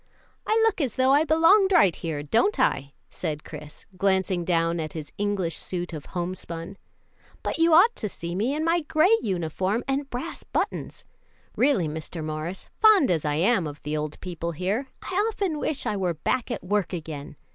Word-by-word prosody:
"I 440 Hz, +1 st, +3 dB
look 440 Hz, -6 st, +1 dB
as 260 Hz, -6 st, -1 dB
though 260 Hz, +1 st, +4 dB
I 295 Hz, +3 st, +4 dB
belonged 330 Hz, +6 st, +5 dB
right 310 Hz, -, +5 dB
here, 155 Hz, -3 st, -4 dB
don't 250 Hz, -, +2 dB
I?" 140 Hz, -, +1 dB, 0.2 s
said 150 Hz, -1 st, -4 dB
Chris, 150 Hz, 0 st, -10 dB
glancing 190 Hz, -2 st, +1 dB
down 170 Hz, -1 st, +1 dB
at 155 Hz, -1 st, -4 dB
his 155 Hz, -3 st, -7 dB
English 200 Hz, -5 st, 0 dB
suit 175 Hz, -1 st, -3 dB
of 155 Hz, -2 st, -7 dB
homespun. 175 Hz, 0 st, -5 dB, 0.7 s
"But -, -, -2 dB
you 330 Hz, -1 st, +5 dB
ought 440 Hz, +8 st, +6 dB
to 210 Hz, -, -3 dB
see 170 Hz, -2 st, -6 dB
me 225 Hz, +10 st, 0 dB
in 310 Hz, +1 st, -1 dB
my 335 Hz, +1 st, +3 dB
gray 320 Hz, +7 st, +4 dB
uniform 190 Hz, +3 st, -1 dB
and 275 Hz, +1 st, -1 dB
brass 255 Hz, +8 st, -5 dB
buttons. -, -, -3 dB, 0.5 s
Really, 255 Hz, -, +2 dB
Mr. 160 Hz, +1 st, -6 dB
Morris, 155 Hz, +4 st, -5 dB
fond 425 Hz, -, +6 dB
as 160 Hz, -3 st, 0 dB
I 145 Hz, -1 st, 0 dB
am 185 Hz, +1 st, +2 dB
of 145 Hz, 0 st, -8 dB
the 150 Hz, +1 st, -2 dB
old 150 Hz, 0 st, -4 dB
people 170 Hz, -2 st, -4 dB
here, 195 Hz, -, -2 dB, 0.2 s
I -, -, -6 dB, 0.2 s
often 385 Hz, -8 st, -2 dB
wish 295 Hz, -, -2 dB
I -, -, 0 dB
were 180 Hz, -4 st, -1 dB
back 245 Hz, -, -1 dB
at -, -, -4 dB
work 200 Hz, 0 st, 0 dB
again. 155 Hz, -3 st, -6 dB
190 Hz, 185 wpm, -25 LUFS, -, 0.7 s, ought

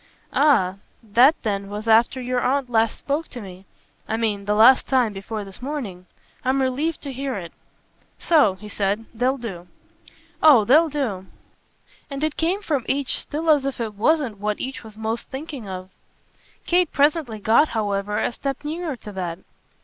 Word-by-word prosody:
"Ah 195 Hz, -11 st, +3 dB, 0.3 s
that 240 Hz, +8 st, +5 dB
then 200 Hz, -2 st, -2 dB
was 210 Hz, +2 st, -6 dB
after 230 Hz, +3 st, +4 dB
your 250 Hz, 0 st, -1 dB
aunt 265 Hz, -1 st, 0 dB
last 225 Hz, -1 st, +2 dB
spoke 295 Hz, +3 st, -2 dB
to 250 Hz, -, -9 dB
me 190 Hz, -3 st, -10 dB, 0.4 s
I 220 Hz, -, -1 dB
mean 210 Hz, -3 st, -1 dB
the 210 Hz, +1 st, +1 dB
last 240 Hz, +5 st, +6 dB
time 250 Hz, -5 st, +2 dB
before 205 Hz, +2 st, -5 dB
this 195 Hz, +2 st, -11 dB
morning. 235 Hz, -11 st, -5 dB, 0.4 s
I'm 260 Hz, +2 st, +1 dB
relieved 270 Hz, +5 st, -1 dB
to 280 Hz, -2 st, -5 dB
hear 270 Hz, 0 st, -3 dB
it. 175 Hz, -4 st, -7 dB, 0.6 s
So," 290 Hz, -, +3 dB
he 210 Hz, +3 st, -11 dB
said, 205 Hz, +2 st, -1 dB
"they'll 250 Hz, +4 st, +1 dB
do." 190 Hz, -8 st, -7 dB, 0.7 s
"Oh 275 Hz, -9 st, +7 dB
they'll 315 Hz, +7 st, +5 dB
do." 230 Hz, -11 st, -3 dB, 0.8 s
And 275 Hz, +1 st, -5 dB
it 310 Hz, -1 st, 0 dB
came 365 Hz, +6 st, 0 dB
from 290 Hz, -8 st, -1 dB
each 275 Hz, -1 st, 0 dB
still 315 Hz, +3 st, -4 dB
as 290 Hz, -3 st, +4 dB
if 275 Hz, -2 st, -3 dB
it 225 Hz, -2 st, -3 dB
wasn't 235 Hz, 0 st, +1 dB
what 210 Hz, 0 st, -2 dB
each 260 Hz, -1 st, -5 dB
was 215 Hz, -1 st, -12 dB
most 220 Hz, +1 st, -3 dB
thinking 270 Hz, -6 st, -7 dB
of. 185 Hz, 0 st, -7 dB, 0.7 s
Kate 355 Hz, -1 st, +2 dB
presently 285 Hz, -5 st, +1 dB
got 225 Hz, +8 st, +4 dB
however 205 Hz, -1 st, -1 dB
a -, -, 0 dB
step 275 Hz, +2 st, -4 dB
nearer 315 Hz, 0 st, -3 dB
to 215 Hz, -3 st, -10 dB
that. 180 Hz, -4 st, -4 dB
240 Hz, 170 wpm, -23 LUFS, 205-280 Hz, 0.8 s, Oh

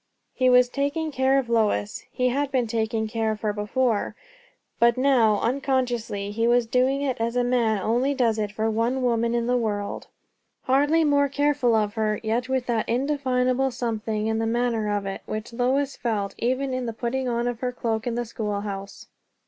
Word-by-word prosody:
He 255 Hz, -1 st, +2 dB
was 250 Hz, 0 st, +6 dB
taking 285 Hz, +4 st, -2 dB
care 265 Hz, 0 st, +2 dB
of 270 Hz, -3 st, 0 dB
Lois; 215 Hz, -, 0 dB
he 250 Hz, 0 st, +1 dB
had 280 Hz, +2 st, -1 dB
been 255 Hz, -3 st, +1 dB
taking 220 Hz, -1 st, -1 dB
care 225 Hz, 0 st, -1 dB
of 215 Hz, -1 st, -3 dB
her 210 Hz, -1 st, 0 dB
before; 215 Hz, +2 st, -1 dB, 0.6 s
but 235 Hz, 0 st, +4 dB
now, 245 Hz, -6 st, +3 dB
unconsciously, 245 Hz, -6 st, -1 dB
he 230 Hz, +2 st, 0 dB
was 240 Hz, 0 st, +3 dB
doing 255 Hz, +4 st, +1 dB
it 260 Hz, -4 st, -2 dB
as 235 Hz, +1 st, -1 dB
a 245 Hz, -, +2 dB
man 235 Hz, -4 st, +1 dB
only 250 Hz, +5 st, +1 dB
does 230 Hz, -4 st, +1 dB
it 210 Hz, -1 st, -2 dB
for 220 Hz, +1 st, -1 dB
one 230 Hz, +4 st, 0 dB
woman 235 Hz, -1 st, +1 dB
in 235 Hz, -1 st, 0 dB
the 250 Hz, +1 st, +1 dB
world. 205 Hz, -3 st, -3 dB, 0.6 s
Hardly 290 Hz, +5 st, +3 dB
more 285 Hz, -2 st, +3 dB
careful 285 Hz, -4 st, +2 dB
of 210 Hz, -1 st, +1 dB
her, 215 Hz, -2 st, 0 dB
yet 235 Hz, +3 st, -1 dB
with 260 Hz, -2 st, 0 dB
that 230 Hz, -3 st, -1 dB
indefinable 260 Hz, 0 st, +1 dB
something 220 Hz, -3 st, -3 dB
in 220 Hz, 0 st, 0 dB
the 225 Hz, -, 0 dB
manner 230 Hz, -2 st, 0 dB
of 205 Hz, -1 st, -1 dB
it, 195 Hz, 0 st, -5 dB
which 215 Hz, +2 st, -5 dB
Lois 260 Hz, +3 st, 0 dB
felt 210 Hz, -4 st, -2 dB
even 260 Hz, +2 st, 0 dB
in 255 Hz, -1 st, -2 dB
the 230 Hz, -, -3 dB
putting 250 Hz, +3 st, -2 dB
on 235 Hz, 0 st, -1 dB
of 245 Hz, -2 st, -3 dB
her 250 Hz, -1 st, -2 dB
cloak 230 Hz, -2 st, -2 dB
in 235 Hz, -, -1 dB
the 240 Hz, 0 st, -2 dB
schoolhouse. 205 Hz, -3 st, -5 dB
240 Hz, 190 wpm, -24 LUFS, 220-260 Hz, 0.6 s, was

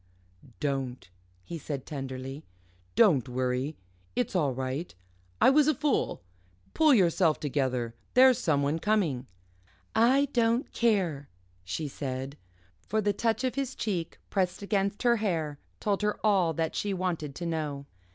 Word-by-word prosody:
"Don't!" 135 Hz, -, -3 dB, 0.3 s
he 170 Hz, -, -6 dB
said 140 Hz, -3 st, -5 dB
tenderly, 135 Hz, 0 st, -6 dB, 0.5 s
"don't 155 Hz, -, +4 dB
worry. 130 Hz, +4 st, -1 dB, 0.4 s
It's 125 Hz, -, -1 dB
all 150 Hz, -7 st, +2 dB
right 130 Hz, -, -4 dB, 0.4 s
I -, -, +6 dB
was 295 Hz, +1 st, +5 dB
a 310 Hz, -, +3 dB
fool. 295 Hz, -, 0 dB, 0.5 s
Pull 310 Hz, -4 st, +5 dB
yourself 170 Hz, -5 st, +3 dB
together 130 Hz, -5 st, -1 dB, 0.2 s
there's 255 Hz, -1 st, +7 dB
someone 145 Hz, -, +1 dB
coming." 165 Hz, -, 0 dB, 0.7 s
"I 260 Hz, +5 st, +4 dB
don't 235 Hz, +1 st, +2 dB
care," 185 Hz, -12 st, +1 dB, 0.3 s
she 95 Hz, -, -3 dB
said, 135 Hz, 0 st, -5 dB, 0.4 s
for 215 Hz, -, -2 dB
the 205 Hz, -1 st, +1 dB
touch 225 Hz, +4 st, 0 dB
of 255 Hz, -, 0 dB
his 270 Hz, -1 st, -3 dB
cheek, 180 Hz, -6 st, -3 dB
pressed 185 Hz, 0 st, 0 dB
against 200 Hz, +1 st, 0 dB
her 240 Hz, -1 st, +4 dB
hair, 160 Hz, -9 st, -1 dB, 0.2 s
told 205 Hz, -1 st, 0 dB
her 210 Hz, 0 st, 0 dB
all 190 Hz, -6 st, +4 dB
that 160 Hz, +1 st, -2 dB
she 200 Hz, -1 st, -1 dB
wanted 170 Hz, -6 st, -2 dB
to 175 Hz, -, -5 dB
know. 150 Hz, -4 st, -3 dB
165 Hz, 140 wpm, -29 LUFS, 140-215 Hz, 0.7 s, there's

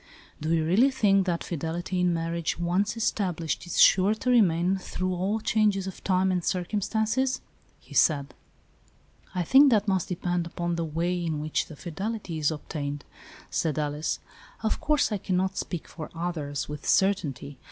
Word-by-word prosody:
" -, -, -27 dB
Do 155 Hz, +2 st, -1 dB
you 160 Hz, -1 st, +2 dB
really 210 Hz, +12 st, +4 dB
think 200 Hz, -7 st, +2 dB
that 170 Hz, -2 st, 0 dB
fidelity 170 Hz, +3 st, -3 dB
in 180 Hz, 0 st, +3 dB
marriage, 165 Hz, 0 st, -2 dB
once 185 Hz, +6 st, 0 dB
established, 180 Hz, -7 st, -1 dB
is 175 Hz, -, -2 dB
sure 195 Hz, +3 st, +6 dB
to 250 Hz, +3 st, -1 dB
remain 185 Hz, -5 st, +3 dB
through 185 Hz, 0 st, -3 dB
all 190 Hz, +5 st, -1 dB
changes 210 Hz, -3 st, +1 dB
of 190 Hz, -, -8 dB
time 190 Hz, 0 st, +2 dB
and 180 Hz, -2 st, 0 dB
circumstance? 220 Hz, +8 st, 0 dB, 0.2 s
" -, -, -35 dB
he -, -, -12 dB
said. 140 Hz, -3 st, +3 dB, 0.5 s
" -, -, -30 dB
I 180 Hz, -, +1 dB
think 275 Hz, -, +7 dB
that 215 Hz, -3 st, +2 dB
must 190 Hz, -3 st, +1 dB
depend 175 Hz, -1 st, -1 dB
upon 170 Hz, 0 st, -2 dB
the 170 Hz, -, -1 dB
way 170 Hz, +3 st, -1 dB
in 160 Hz, -3 st, -2 dB
which 155 Hz, +1 st, -1 dB
the 155 Hz, -, -10 dB
fidelity 190 Hz, +1 st, -4 dB
is 150 Hz, -, +2 dB
obtained," 145 Hz, -2 st, -5 dB, 0.5 s
said 155 Hz, -2 st, 0 dB
Alice. 150 Hz, +1 st, -1 dB, 0.2 s
" -, -, -23 dB
Of 220 Hz, -, 0 dB
course, 300 Hz, -5 st, +2 dB
I 210 Hz, -, -1 dB
cannot 185 Hz, +1 st, 0 dB
speak 175 Hz, -3 st, -4 dB
for 155 Hz, -2 st, -8 dB
others, 150 Hz, -5 st, -3 dB
with 150 Hz, -1 st, -5 dB
certainty. 145 Hz, -8 st, +1 dB
180 Hz, 175 wpm, -27 LUFS, 160-200 Hz, 0.5 s, think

